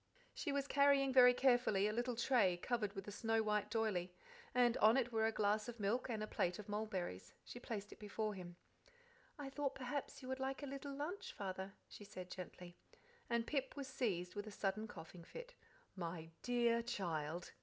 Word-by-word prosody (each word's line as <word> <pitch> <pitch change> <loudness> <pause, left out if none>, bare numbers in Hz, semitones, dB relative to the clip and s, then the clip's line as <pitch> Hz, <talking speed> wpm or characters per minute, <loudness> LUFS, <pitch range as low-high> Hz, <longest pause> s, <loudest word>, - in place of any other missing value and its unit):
She 310 - -2
was 280 -1 0
carrying 280 -2 +5
very 250 -1 +9
carefully 245 -7 +4
a 210 - 0
little 240 +1 0
tray 230 -7 +4
covered 210 0 -1
with 195 0 -6
a - - -4
snow 225 +1 +1
white 210 -1 +1
doyley, 210 -5 0 0.4
and 245 -1 +4
on 220 +4 +6
it 245 -2 +1
were 220 -1 +3
a - - +2
glass 215 +1 +1
of 235 -1 -7
milk 215 +6 0
and 220 -2 -1
a - - -3
plate 175 -3 0
of 210 - -8
mulberries. 200 - -3
She 245 - -7
placed 210 -4 -5
it - - -11
before 215 +1 -2
him. 175 -3 -8 0.8
"I 280 -2 -5
thought 275 -1 -1
perhaps 270 +1 -4
you - - -6
would 260 0 -2
like 265 +2 -2
a - - -1
little 275 0 -5
lunch, 315 +8 -4
Father," 190 0 -4
she - - -10
said 185 -2 -8
gently; 180 -1 -8 0.5
and 235 -1 +1
Pip 275 -1 -1
was 280 -2 -4
seized 205 -10 -1
with 205 0 -4
a - - -6
sudden 205 +2 -1
coughing 170 -2 -10
fit. - - -9 0.4
"My 165 -3 -5
DEAR 235 -1 +3
child!" 170 -7 -2
220 Hz, 195 wpm, -40 LUFS, 195-255 Hz, 0.8 s, very